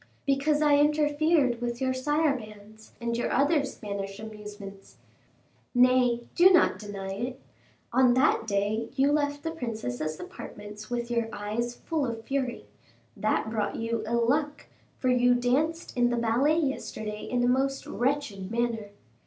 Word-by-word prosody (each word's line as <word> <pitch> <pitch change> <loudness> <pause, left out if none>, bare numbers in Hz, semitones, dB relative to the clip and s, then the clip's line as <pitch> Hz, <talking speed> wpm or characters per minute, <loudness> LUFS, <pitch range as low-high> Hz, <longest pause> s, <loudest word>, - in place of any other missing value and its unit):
"Because 295 +2 +2
I 295 -1 +5
interfered 295 -3 +2
with 240 0 -2
your 260 -1 0
sarabands 245 -7 -2
and 235 -1 -2
your 240 - -1
other 285 +2 +3
Spanish 200 -7 -5
amusements. 210 -2 -10 0.8
Nay, 245 -1 +4
do 355 +2 +7
not 360 -2 +4
deny 200 -2 -6
it. 245 +6 -4 0.5
On 250 -1 +5
that 255 -4 +3
day 210 +3 0
you 275 +1 +3
left 290 -1 0
the 325 - -2
princess's 215 - -4
apartments 210 +1 -9
with 240 0 -3
your 235 -1 0
eyes 220 +4 -3
full 305 -1 -2
of 225 -1 -5
fury; 265 -3 -2 0.5
that 220 - 0
brought 210 -2 -1
you 230 0 -2
ill 235 0 +1
luck, 295 +3 0 0.3
for 255 - 0
you 245 0 +4
danced 285 +7 0
in 245 -1 +3
the 240 - 0
ballet 240 +7 +2
yesterday 220 -7 -3
in 245 -1 -1
a - - +3
most 270 +2 +1
wretched 245 -8 -2
manner. 230 -2 -1
245 Hz, 145 wpm, -28 LUFS, 220-280 Hz, 0.8 s, do